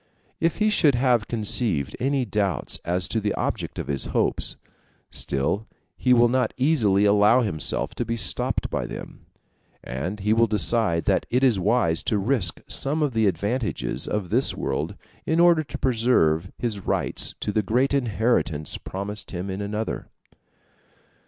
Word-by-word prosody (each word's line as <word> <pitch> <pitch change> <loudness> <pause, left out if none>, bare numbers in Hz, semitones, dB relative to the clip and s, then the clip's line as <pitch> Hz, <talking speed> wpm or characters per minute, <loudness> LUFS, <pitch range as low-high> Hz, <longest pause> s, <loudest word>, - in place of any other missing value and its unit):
If 165 0 +1
he 215 0 +2
should 150 -9 +3
have 120 -3 +2
conceived 105 - +1
any 135 +1 0
doubts 100 -5 -2
as 90 +2 0
to 115 - 0
the 105 -1 -1
object - - -3
of - - -3
his 70 -2 -2
hopes, - - 0 0.6
still 70 +11 -1 0.3
he 125 - 0
will 120 -1 +6
not 130 +1 0
easily 115 -9 +3
allow 105 +4 +5
himself 80 -9 -2
to - - -2
be 115 - -2
stopped 100 -6 +1
by - - -2
them; - - -9 0.6
and 85 +11 -5
he 105 +2 +2
will 115 +1 +4
decide 105 -3 +2
that - - +1
it 125 +2 +1
is 120 -7 +4
wise 95 -4 +2
to 105 - +1
risk 100 -4 0
some 150 +3 -1
of 145 -4 -1
the 110 -2 +2
advantages 105 +7 -2
of 100 -4 -3
this 125 +5 +1
world, 75 +8 -3 0.3
in 160 +2 +1
order 170 -2 +5
to - - -7
preserve 110 -9 +2
his 115 -4 -2
rights - - -1
to 105 - -2
the 110 - +1
great 125 +7 +1
inheritance 110 - 0
promised 100 +2 -5
him 95 +1 -4
in 95 +2 -4
another. 105 +2 -4
110 Hz, 160 wpm, -24 LUFS, 95-125 Hz, 0.6 s, will